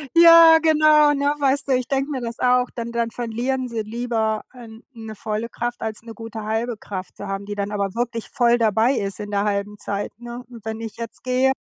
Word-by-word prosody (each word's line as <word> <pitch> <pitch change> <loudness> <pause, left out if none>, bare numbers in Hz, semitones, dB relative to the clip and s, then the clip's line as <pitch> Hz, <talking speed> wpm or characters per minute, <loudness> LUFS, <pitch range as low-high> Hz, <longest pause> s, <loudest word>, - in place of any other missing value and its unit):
Ja, 335 -1 +9
genau, 305 -2 +5
ne, 285 +1 +1
weißt 280 0 +1
du? - - +2
Ich 250 -1 0
denke 275 +2 -1
mir 265 - -2
das 235 -1 -5
auch. 250 0 +3
Dann 235 0 -4
dann 235 -1 -1
verlieren 245 +2 -2
sie 230 -2 -3
lieber 220 -1 -2
ein 230 -2 -13
'ne 220 -2 -9
volle 215 +2 -3
Kraft 240 0 -4
als 220 -1 -4
'ne 230 -1 -9
gute 225 -1 -8
halbe 225 +2 -2
Kraft 185 -3 -7
zu 200 - -8
haben, 195 0 -4
die 205 0 -5
dann 200 0 -3
aber 200 0 -2
wirklich 235 -1 -3
voll 240 -1 +3
dabei 225 +3 +2
ist 200 0 -3
in 205 0 -7
der 200 +1 0
halben 205 0 -2
Zeit, 200 0 -4
ne? 240 +1 -8
Und 230 -3 -13
wenn 220 0 -4
ich 225 -1 -7
jetzt 230 -1 -8
gehe, 255 +1 +2
230 Hz, 220 wpm, -22 LUFS, 215-255 Hz, -, Ja